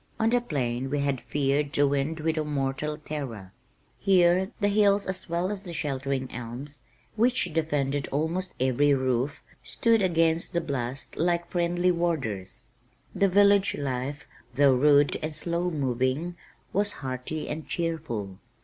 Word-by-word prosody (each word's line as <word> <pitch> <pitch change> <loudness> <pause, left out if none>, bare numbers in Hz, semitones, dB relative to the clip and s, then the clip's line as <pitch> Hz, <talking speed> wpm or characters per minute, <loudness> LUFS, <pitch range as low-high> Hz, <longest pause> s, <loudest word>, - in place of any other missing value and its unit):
On 225 +1 +2
the 245 0 +3
plain 130 - -2
we 145 0 0
had 140 -3 0
feared 140 0 0
the 145 +1 +4
wind 145 +3 -1
with 160 0 0
a 155 - 0
mortal 145 +1 -2
terror, 130 - -6 0.5
here 185 0 +4
the 205 - +2
hills 205 -1 +3
as 190 -1 -4
well 175 +3 0
as 205 -2 -4
the 180 -4 -7
sheltering 135 -3 -2
elms 120 +5 -7 0.4
(which 225 -7 +2
defended 145 -3 0
almost 165 +6 -2
every 130 +3 +3
roof) 130 +2 -1 0.2
stood 230 -2 +2
against 165 -2 +2
the 170 - +2
blast 135 -3 -4
like 170 +1 +1
friendly 175 +1 +2
warders. 135 - -2 0.5
The 195 - +3
village 200 +1 +4
life, 140 +1 -3 0.3
though 140 0 +5
rude 145 +2 +4
and 155 0 -3
slow 170 +2 -1
moving, 135 +3 -1 0.4
was 205 +1 +2
hearty 130 +4 -5
and 155 0 -5
cheerful. 135 - -3
150 Hz, 145 wpm, -27 LUFS, 135-175 Hz, 0.5 s, though